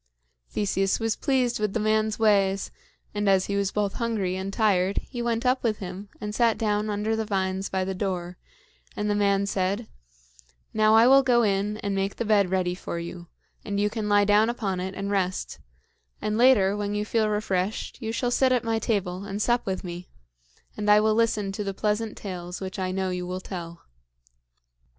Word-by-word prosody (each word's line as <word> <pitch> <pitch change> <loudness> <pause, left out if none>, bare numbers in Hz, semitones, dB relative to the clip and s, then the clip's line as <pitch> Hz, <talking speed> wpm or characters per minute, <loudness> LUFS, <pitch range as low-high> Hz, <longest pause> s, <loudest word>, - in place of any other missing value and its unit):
Theseus 195 -1 0
was 225 -1 0
pleased 255 -5 0
with 210 -2 -1
the - - 0
man's 215 0 +1
ways, 200 -3 +2 0.4
and 205 -1 0
as 190 -1 +4
he 200 - -2
was 200 -1 0
both 205 -2 -1
hungry 215 -6 -1
and 190 +1 -4
tired, 195 -3 +2
he 245 -3 -4
went 235 +1 -1
up 255 +1 +2
with 220 -3 0
him 190 +2 -7
and 210 0 -5
sat 230 0 +2
down 210 -1 0
under 210 +2 -1
the 220 - -1
vines 190 -2 -1
by 190 -1 -1
the 190 - -2
door; 180 -2 -3 0.6
and 210 0 -1
the - - +2
man 200 -1 +2
said: 200 +3 -1 0.9
"Now 215 0 +4
I 225 +1 +7
will 270 +2 +7
go 245 -3 +3
in 205 0 0
and 200 - -1
make 195 0 -1
the 235 - -3
bed 205 -3 +3
ready 185 -1 0
for 180 -1 -5
you, 170 +1 -7 0.4
and 200 -1 -2
you 210 0 +1
can 215 -2 -3
lie 205 0 +4
down 210 +2 +4
upon 200 -6 -2
it 190 +1 -4
and 200 +1 -3
rest; 185 - -1 0.6
and 210 0 -2
later, 220 -5 +5
when 205 0 -2
you 210 0 -1
feel 220 0 +1
refreshed, 210 +1 -2
you 225 -1 -3
shall 245 +2 -1
sit 260 +1 +3
at 250 -2 +2
my 225 -1 0
table 195 -5 -1
and 200 0 -4
sup 240 +2 +1
with 190 -1 -2
me, 175 0 -7 0.7
and 210 0 -2
I 210 0 +7
will 215 0 +3
listen 215 -3 +1
to 210 +2 -4
the 195 -1 -4
pleasant 210 +2 -1
tales 180 -2 -6
which 190 0 -6
I 185 -1 -1
know 190 0 -1
you 180 0 -3
will 185 +1 -3
tell." 170 -3 -8
205 Hz, 200 wpm, -26 LUFS, 190-220 Hz, 0.9 s, I